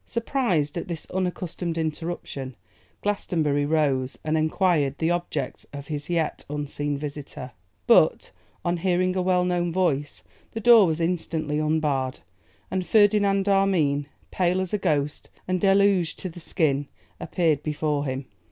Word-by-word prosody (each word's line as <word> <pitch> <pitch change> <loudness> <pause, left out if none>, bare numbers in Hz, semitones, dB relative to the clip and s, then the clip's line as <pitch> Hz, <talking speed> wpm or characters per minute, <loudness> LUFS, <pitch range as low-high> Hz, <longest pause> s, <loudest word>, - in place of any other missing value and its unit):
Surprised 195 - -1
at - - -7
this 170 -3 -5
unaccustomed 180 -2 -3
interruption, 155 -5 -4 0.5
Glastonbury 155 -8 0
rose, 140 -4 +1
and 155 0 0
enquired 155 -3 +1
the 160 +1 +1
object 175 -6 -3
of 140 0 -7
his 150 0 -5
yet 165 -3 -1
unseen 145 0 -3
visitor; 140 -3 -7 0.3
but, - - +4 0.3
on 175 0 +1
hearing 185 +1 +1
a 185 - +1
well 180 -1 +2
known 175 -1 0
voice, 155 -6 -1 0.3
the 225 - -3
door 225 -3 +7
was 160 0 -1
instantly 165 -3 -1
unbarred, 150 - 0 0.5
and 185 -1 0
Ferdinand 205 -1 +3
Armine, 175 -8 +2 0.2
pale 180 0 +1
as 185 0 -3
a 210 - +1
ghost 150 -5 -1 0.2
and 185 -1 0
deluged 195 -4 +3
to 185 - -5
the 175 - -11
skin, 145 -5 0 0.3
appeared 160 -5 +1
before 150 -1 -1
him. 130 0 -3
165 Hz, 140 wpm, -25 LUFS, 145-185 Hz, 0.5 s, door